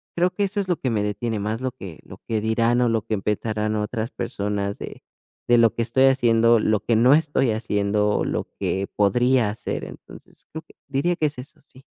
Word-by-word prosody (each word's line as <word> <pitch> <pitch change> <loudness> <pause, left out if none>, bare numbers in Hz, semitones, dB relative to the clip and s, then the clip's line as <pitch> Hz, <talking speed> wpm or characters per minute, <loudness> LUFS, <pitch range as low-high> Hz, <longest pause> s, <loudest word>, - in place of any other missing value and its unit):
creo 175 +1 +2
que 205 - 0
eso 205 +1 -2
es 185 - -6
lo 175 - +1
que 130 - -1
me 105 -3 0
detiene 110 +2 -2
más 110 +3 -2
lo 130 -1 -2
que 95 - -10
lo - - -13
que 110 -1 0
dirán 115 +2 +1
o 120 - +3
lo 115 -1 +1
que 110 -2 -1
pensarán 105 +1 -2
otras 110 +2 -3
personas 100 0 -3
de - - -8 0.5
de 120 0 +5
lo 115 -1 +4
que 115 - 0
estoy 130 +3 +2
haciendo, 115 -3 +4
lo 110 -1 +1
que 115 +4 0
no 125 +4 +5
estoy 145 -5 +2
haciendo, 105 -1 0
lo - - -2
que 95 +1 -2
podría 120 +3 +2
hacer, 105 - -4
entonces, - - -13
creo 160 +1 -7
que - - -21
diría 140 +6 0
que 155 - +1
es 145 -3 -7
eso, 125 +2 -11
sí. 130 +1 -20
115 Hz, 215 wpm, -23 LUFS, 105-130 Hz, 0.5 s, de